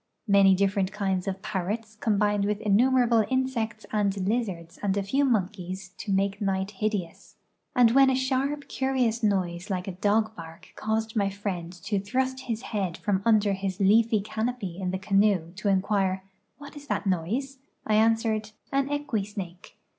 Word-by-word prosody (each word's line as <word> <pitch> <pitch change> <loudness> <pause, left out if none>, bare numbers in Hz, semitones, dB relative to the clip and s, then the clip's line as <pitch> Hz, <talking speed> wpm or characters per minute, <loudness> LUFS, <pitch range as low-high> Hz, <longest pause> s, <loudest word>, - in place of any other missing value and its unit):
Many 200 -1 +6
different 195 0 +1
kinds 190 -3 -1
of 195 0 -3
parrots 215 +3 -3
combined 205 -1 +1
with 205 0 -1
innumerable 235 +2 +4
insects 240 -5 -1
and 205 -2 +1
lizards 190 -7 -2
and 200 -1 0
a 200 - 0
few 270 +9 +1
monkeys 190 -6 -1
to 205 - -4
make 195 +2 0
night 195 0 -1
hideous; 200 -4 -4 0.4
and 245 -3 +6
when 270 +2 +6
a 260 - +2
sharj), 270 +2 -1
curious 255 -4 0
noise 185 -3 0
like 185 -1 -2
a - - -2
dog 215 +4 +1
bark 165 +1 -11
caused 220 +1 -2
my 200 -2 +2
friend 190 -4 -4
to 205 -1 0
thrust 260 +6 -1
his 230 0 -3
head 195 -6 -2
from 195 -2 0
under 215 -3 +4
his 190 0 -3
leafy 215 +2 +4
canopy 220 -3 -3
in 185 - -1
the 190 - -1
canoe 195 -3 +2
to 210 0 -1
inquire, 190 -1 +1 0.2
" - - -48
What 285 +1 -11
is 290 0 -11
that - - -1
noi.se?" 220 +10 -1 0.3
I 215 - 0
answered 220 -1 +2 0.2
"An 275 0 +1
equi 290 -8 -1
snake." 190 -3 -8
205 Hz, 170 wpm, -27 LUFS, 190-230 Hz, 0.4 s, Many